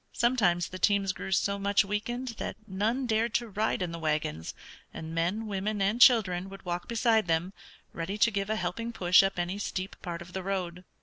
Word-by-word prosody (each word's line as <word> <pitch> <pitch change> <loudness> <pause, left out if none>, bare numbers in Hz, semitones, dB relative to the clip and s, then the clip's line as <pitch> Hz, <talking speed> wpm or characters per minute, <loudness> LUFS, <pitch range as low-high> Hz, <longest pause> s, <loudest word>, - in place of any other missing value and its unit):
Sometimes 205 -9 +2
the 185 - -7
teams 200 -2 +2
grew 190 - -7
so 200 +2 +1
much 200 +1 +3
weakened 240 +6 -3
that - - -4
none 220 +6 -1
dared 225 0 0
to 235 - +1
ride 210 -2 -1
in 175 - -3
the 170 - -6
wagons, 150 - -2 0.4
and 160 0 -7
men, 175 +7 -1
women, 205 +1 -2
and 200 +5 +1
children 195 -8 +5
would 195 0 -11
walk 175 0 -3
beside 225 -3 +2
them, 165 +3 0 0.4
ready 175 +5 -4
to 230 +2 +4
give 200 0 -2
a 220 - +1
helping 215 +5 -3
push 180 -5 +5
up 195 -1 -1
any 175 +3 -2
steep 190 -2 -4
part 170 -2 -5
of 180 +1 -15
the 190 - -3
road. 180 -2 -3
195 Hz, 200 wpm, -29 LUFS, 175-220 Hz, 0.4 s, children